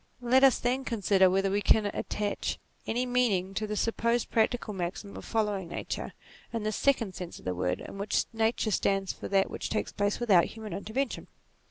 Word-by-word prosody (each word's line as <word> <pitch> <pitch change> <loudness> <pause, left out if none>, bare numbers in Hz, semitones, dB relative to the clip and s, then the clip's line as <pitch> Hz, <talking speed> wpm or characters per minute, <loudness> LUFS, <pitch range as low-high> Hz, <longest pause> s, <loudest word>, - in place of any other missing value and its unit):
Let 255 +2 +4
us 270 -2 +7
then 255 +2 0
consider 200 -5 +3
whether 195 +1 +1
we 205 +1 +1
can 210 +1 +4
attach 205 0 -2 0.3
any 245 +3 0
meaning 225 -7 +1
to 215 +2 -2
the 210 - -3
supposed 235 +2 0
practical 225 -1 +1
maxim 190 +2 -4
of - - -8
following 210 -5 -1
Nature, - - -5 0.4
in 230 -2 -3
this 215 -1 -1
second 235 -8 +1
sense 180 -1 -7
of - - -15
the 90 - 0
word, 90 +1 -1
in 195 - -8
which 200 - +1
Nature 225 0 +1
stands 195 -1 +1
for - - -7
that 195 -1 +2
which - - -4
takes 220 - -1
place 205 0 0
without 200 -8 +4
hu 220 - -9
man 215 -4 -6
intervention. 220 +8 -3
210 Hz, 195 wpm, -29 LUFS, 195-235 Hz, 0.4 s, us